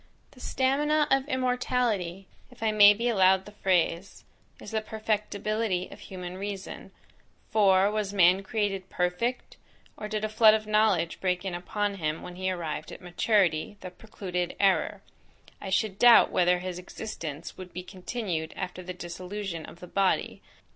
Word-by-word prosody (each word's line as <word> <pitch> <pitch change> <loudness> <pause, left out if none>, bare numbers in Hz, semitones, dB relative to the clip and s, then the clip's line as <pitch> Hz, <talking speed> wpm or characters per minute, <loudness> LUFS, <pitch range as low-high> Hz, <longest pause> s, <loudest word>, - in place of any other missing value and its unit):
The 255 - -18
stamina 295 +4 +1
of 270 +1 +2
immortality, 250 - -1 0.2
if 250 -3 -11
I 220 - +2
may 205 -1 +8
be 235 +3 -1
allowed 190 -4 +4
the 210 - -11
phrase, 185 -2 0 0.4
is - - -10
the 220 -1 0
perfectibility 215 -2 -2
of - - -11
human 180 -1 -8
reason; 200 -1 -6 0.6
for, 195 -2 +4
was 210 -2 -2
man 185 -1 +5
created 195 -2 -2
perfect, 180 +8 -2 0.4
or 210 - -6
did 215 0 -2
a - - 0
flood 215 0 +6
of 215 0 -3
knowledge 210 -6 +1
break 180 0 -1
in 190 - -3
upon 200 +3 -2
him, 155 -2 -3
when 180 - -8
he 185 +1 -2
arrived 165 -4 -4
at - - -9
maturity, 180 0 +1
that 180 -1 -10
precluded 180 -5 -4
error, 195 -1 +2 0.6
I 195 - -5
should 195 +1 0
doubt 240 -1 +7
whether 180 0 +3
his 180 0 -5
existence 170 -5 -7
would 185 -1 -10
be 180 +1 -6
continued 180 -3 -4
after 185 -1 -5
the 180 0 -7
dissolution 180 0 -6
of 170 - -13
the 180 - -9
body. 195 +1 0
195 Hz, 160 wpm, -27 LUFS, 180-215 Hz, 0.6 s, may